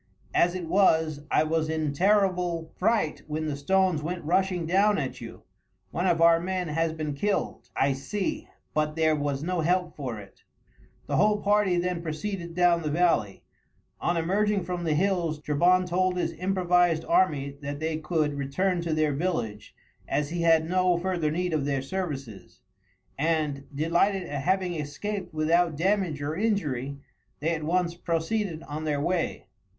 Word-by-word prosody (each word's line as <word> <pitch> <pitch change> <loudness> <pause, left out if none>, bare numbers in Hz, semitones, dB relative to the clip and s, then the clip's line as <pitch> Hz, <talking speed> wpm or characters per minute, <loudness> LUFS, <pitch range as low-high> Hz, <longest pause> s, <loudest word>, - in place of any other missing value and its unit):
As 175 +1 +3
it 180 -2 -4
was 160 -5 +3
I - - +3
was 155 0 0
in 155 -2 -1
terrible 180 -2 +1
fright 215 -5 +1
when 155 +1 -3
the 150 -2 -2
stones 185 +2 +2
went 170 +1 -4
rushing 180 0 +1
down 200 +5 +3
at 140 -3 -4
you. - - -9 0.5
One 175 +3 -1
of 170 -2 +2
our 165 0 +6
men 180 -1 -2
has 165 +1 0
been 155 -2 -4
killed, 200 +8 -2
I 135 0 +2
see; 190 +9 -3 0.3
but 150 0 0
there 160 -1 +3
was 145 -1 -2
no 180 0 -1
help 180 +1 0
for 130 -6 -4
it." 100 -2 -13 0.6
The - - -1
whole 210 0 +3
party 205 -3 +3
then 175 -1 -1
proceeded 170 +2 -4
down 175 -1 +4
the 155 - -2
valley. 155 - +1 0.6
On 175 - 0
emerging 200 +4 +1
from 175 0 -4
the 155 -2 +1
hills 170 -3 0
Trebon 175 +5 +3
told 180 +1 +1
his 170 -1 -1
improvised 180 -1 +2
army 145 -6 +1
that 145 0 -5
they 160 0 -1
could 155 -2 0
return 170 +7 -1
to 165 -2 -1
their 155 -2 +1
village, 130 - -3 0.3
as 145 +1 -1
he 175 0 -2
had 165 -1 +4
no 180 0 +2
further 175 -3 -1
need 175 +2 -1
of 150 -3 0
their 140 -2 -1
services, 135 - -6 0.6
and, 150 -3 0
delighted 170 +6 +1
at 145 -5 -4
having 185 +2 +1
escaped 175 +6 -4
without 160 +1 +2
damage 180 -4 0
or 150 +2 -2
injury, 150 - -1 0.4
they 160 +3 0
at 160 - -3
once 170 +2 +1
proceeded 170 +1 -2
on 150 +1 -6
their 150 -2 0
way. 170 +3 -1
165 Hz, 165 wpm, -27 LUFS, 150-185 Hz, 0.6 s, our